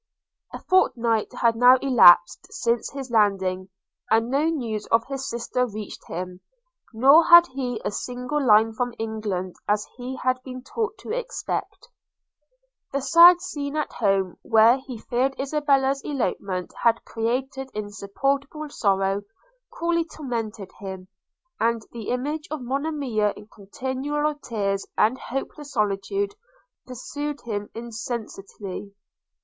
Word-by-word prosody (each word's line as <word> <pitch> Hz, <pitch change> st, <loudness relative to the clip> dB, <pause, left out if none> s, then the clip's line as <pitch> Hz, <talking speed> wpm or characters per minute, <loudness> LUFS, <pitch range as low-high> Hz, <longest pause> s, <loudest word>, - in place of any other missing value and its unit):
A -, -, -6 dB
fortnight 235 Hz, -, +1 dB
had 230 Hz, -1 st, +4 dB
now 245 Hz, +2 st, +7 dB
elapsed 220 Hz, -10 st, +6 dB
since 235 Hz, 0 st, -1 dB
his 270 Hz, -3 st, -7 dB
landing, 190 Hz, -4 st, +1 dB, 0.4 s
and 225 Hz, +2 st, +2 dB
no 285 Hz, +3 st, +2 dB
news 240 Hz, -10 st, -2 dB
of 230 Hz, +1 st, +2 dB
his 270 Hz, -1 st, -5 dB
sister 245 Hz, +1 st, -1 dB
reached 215 Hz, -2 st, -8 dB
him, 180 Hz, +1 st, -6 dB, 0.5 s
nor 275 Hz, +8 st, +6 dB
had 345 Hz, 0 st, +9 dB
he 250 Hz, -3 st, -3 dB
a -, -, 0 dB
single 250 Hz, +6 st, -3 dB
line 220 Hz, -2 st, +5 dB
from 245 Hz, +1 st, -3 dB
England 210 Hz, -5 st, -4 dB
as 210 Hz, 0 st, +1 dB
he 255 Hz, +1 st, -5 dB
had 255 Hz, 0 st, -1 dB
been 255 Hz, -1 st, -8 dB
taught 445 Hz, -, -3 dB
to -, -, -7 dB
expect. -, -, -4 dB, 1.0 s
The 275 Hz, -, 0 dB
sad 340 Hz, +5 st, +7 dB
scene 290 Hz, -5 st, -5 dB
at 305 Hz, -, -2 dB
home, 195 Hz, -4 st, 0 dB
where 225 Hz, +3 st, +5 dB
he 260 Hz, -2 st, -8 dB
feared 255 Hz, +4 st, -1 dB
Isabella's 275 Hz, -1 st, +1 dB
elopement 200 Hz, -9 st, -3 dB
had 230 Hz, -1 st, +2 dB
created 260 Hz, +4 st, -3 dB
insupportable 275 Hz, +9 st, -3 dB
sorrow, 195 Hz, -4 st, +1 dB, 0.5 s
cruelly 335 Hz, 0 st, 0 dB
tormented 230 Hz, -, -5 dB
him; 190 Hz, -2 st, -8 dB, 0.5 s
and 230 Hz, -1 st, +1 dB
the 230 Hz, -3 st, -7 dB
image 295 Hz, +5 st, -2 dB
of 305 Hz, -4 st, -5 dB
Monimia 265 Hz, -6 st, -1 dB
in 210 Hz, +1 st, -14 dB
continual 265 Hz, +8 st, -3 dB
tears 205 Hz, -8 st, -2 dB
and 245 Hz, +5 st, +3 dB
hopeless 280 Hz, +2 st, -6 dB
solitude, 215 Hz, -, -1 dB, 0.5 s
pursued 290 Hz, +4 st, -5 dB
him 205 Hz, -3 st, -4 dB
incessantly. 220 Hz, -4 st, -7 dB
245 Hz, 125 wpm, -24 LUFS, 210-275 Hz, 1.0 s, had